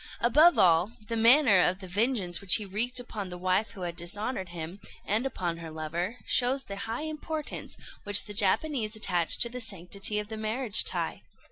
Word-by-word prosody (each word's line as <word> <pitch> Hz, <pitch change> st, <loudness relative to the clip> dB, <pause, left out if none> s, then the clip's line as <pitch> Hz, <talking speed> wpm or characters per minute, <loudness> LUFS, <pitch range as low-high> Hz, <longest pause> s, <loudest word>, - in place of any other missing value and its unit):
Above 300 Hz, +9 st, +5 dB
all, 175 Hz, +4 st, +3 dB, 0.2 s
the 230 Hz, -, -2 dB
manner 230 Hz, -2 st, +5 dB
of 180 Hz, +1 st, +1 dB
the 190 Hz, -1 st, -10 dB
vengeance 195 Hz, -3 st, -1 dB
which 195 Hz, -2 st, +5 dB
he 215 Hz, -, -1 dB
wreaked 230 Hz, +6 st, 0 dB
upon 215 Hz, -6 st, -7 dB
the 180 Hz, -, -8 dB
wife 185 Hz, +4 st, 0 dB
who 195 Hz, -, -10 dB
had 175 Hz, -1 st, -4 dB
dishonoured 190 Hz, +3 st, -4 dB
him, 170 Hz, +2 st, -8 dB, 0.3 s
and 220 Hz, +6 st, 0 dB
upon 175 Hz, -9 st, -4 dB
her 165 Hz, -1 st, -8 dB
lover, 165 Hz, +7 st, -4 dB
shows 260 Hz, +2 st, +2 dB
the 200 Hz, -, -8 dB
high 230 Hz, +6 st, -3 dB
importance 310 Hz, 0 st, -6 dB, 0.3 s
which 205 Hz, 0 st, +3 dB
the 205 Hz, -, -8 dB
Japanese 220 Hz, +3 st, +1 dB
attach 180 Hz, -6 st, 0 dB
to -, -, +4 dB
the 250 Hz, +1 st, -7 dB
sanctity 200 Hz, 0 st, 0 dB
of 210 Hz, 0 st, -3 dB
the 220 Hz, 0 st, -7 dB
marriage 220 Hz, +1 st, +2 dB
tie. -, -, -2 dB
205 Hz, 190 wpm, -28 LUFS, 180-240 Hz, 0.3 s, Above